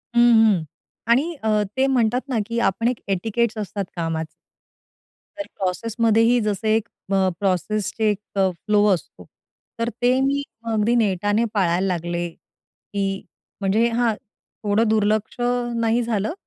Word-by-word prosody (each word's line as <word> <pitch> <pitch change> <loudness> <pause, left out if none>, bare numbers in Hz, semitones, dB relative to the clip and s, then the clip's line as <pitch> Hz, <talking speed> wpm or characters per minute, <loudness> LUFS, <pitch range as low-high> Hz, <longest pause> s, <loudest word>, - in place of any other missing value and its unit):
हं, 240 - +6 0.3
हं. 165 - -3 0.5
आणि 300 +8 +3
अ, 220 - +1 0.3
ते 265 - +4
म्हणतात 250 -1 +2
ना, 245 -4 0
की 235 0 -2
आपण 230 +5 -2
एक 250 -2 0
एटिकेट्स 220 +4 0
असतात 200 -1 -3
कामात. 165 -1 -2 1.1
तर 300 - -4
प्रोसेसमध्येही 230 +4 +2
जसं 210 0 -2
एक 220 0 +2 0.2
अ, 195 -1 +3
प्रोसेसचे 210 +3 0
एक 205 - -2 0.2
फ्लो 195 +3 +2
असतो. 175 - -6 0.5
तर 230 +1 0
ते 250 +2 +3
मी 280 +1 +1 0.3
अगदी 220 +2 +2
नेटाने 205 0 +1
पाळायला 185 -2 +1
लागले, 175 -1 -2
की 195 +3 -6 0.4
म्हणजे 215 +5 +2
हां, 235 -1 +1 0.5
थोडं 215 +2 +2
दुर्लक्ष 215 +1 +1 0.4
नाही 230 +1 +1
झालं. 220 +3 -1
215 Hz, 130 wpm, -22 LUFS, 195-230 Hz, 1.1 s, हं